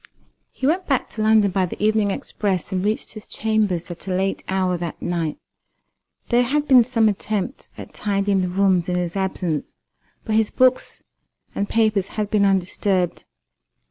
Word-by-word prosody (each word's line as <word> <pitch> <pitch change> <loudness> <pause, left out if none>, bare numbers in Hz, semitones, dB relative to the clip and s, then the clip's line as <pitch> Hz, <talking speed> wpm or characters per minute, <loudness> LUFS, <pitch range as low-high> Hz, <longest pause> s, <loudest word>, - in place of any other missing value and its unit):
He - - -5
went 355 +6 +1
back 270 -4 0
to 220 - -5
London 215 -2 +4
by 185 -1 +1
the - - -8
evening 215 -1 +2
express, 195 -1 -2
and 185 -1 -1
reached 215 +2 -2
his 215 -2 -10
chambers 210 -6 -1
at 175 +2 -10
a - - -2
late 190 +1 -1
hour 190 -1 +1
that 170 -1 -5
night. 170 -3 -2 0.9
There 240 0 +4
had 290 +4 0
been 255 -3 +7
some 230 -2 +2
attempt 210 +3 -3
at - - -10
tidying 200 -1 0
the 180 - 0
rooms 185 -2 +2
in 180 - 0
his 175 0 -2
absence; 180 -5 -2 0.5
but 220 - -2
his 220 -1 +3
books 255 0 +1 0.5
and 200 - -2
papers 215 -4 +2
had 210 -1 -1
been 205 -2 +3
undisturbed. 185 -1 0
200 Hz, 170 wpm, -22 LUFS, 185-220 Hz, 0.9 s, been